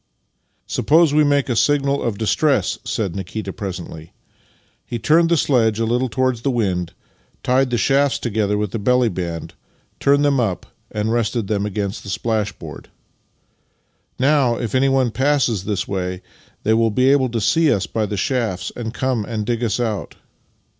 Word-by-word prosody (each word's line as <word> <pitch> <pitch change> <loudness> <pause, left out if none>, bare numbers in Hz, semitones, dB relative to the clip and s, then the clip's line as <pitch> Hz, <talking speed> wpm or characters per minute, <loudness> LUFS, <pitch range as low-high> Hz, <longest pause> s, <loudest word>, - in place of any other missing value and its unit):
" - - -47
Suppc3se 160 0 +3
we 150 0 +5
make 145 -1 +2
a 120 - -1
signal 140 +2 +2
of 115 -4 -2
distress," 130 - +1
said 100 -6 -2
Nikita, 95 +3 -5
presently. 90 -6 -7 0.7
He 120 - -5
turned 160 +8 +3
the 170 - +3
sledge 115 -7 +2
a 115 - +1
little 125 +3 0
towards 130 -1 0
the 135 - 0
wind, 95 -9 -1 0.5
tied 130 +1 +2
the 120 - 0
shafts 135 +3 +2
together 105 -3 -1
with 105 -2 -2
the 115 - -3
belly 125 +3 +3
band, 85 -4 -5 0.5
turned 140 +1 +3
them 140 -2 +2
up, 105 -7 -1 0.2
and 105 +1 -2
rested 115 -1 0
them 105 0 -1
against 100 -1 -3
the 100 - -9
splashboard. 105 -8 -3 0.7
" - - -45
Now, 135 -3 +3
if 120 -3 -4
anyone 130 -2 +2
passes 130 -7 +1
this 100 -3 -2
way 90 -1 -3 0.4
they 110 - +3
will 115 0 +3
be 130 +5 +2
able 135 -2 +3
to 115 0 -2
see 150 +9 +3
us 95 -2 +1
by 110 +3 -2
the 105 - -4
shafts, 110 -6 -1
and 115 0 -5
come 130 -4 0
and 110 -1 -4
dig 120 +1 -1
us 115 +1 0
out. 110 -4 -3
115 Hz, 175 wpm, -20 LUFS, 105-130 Hz, 0.7 s, we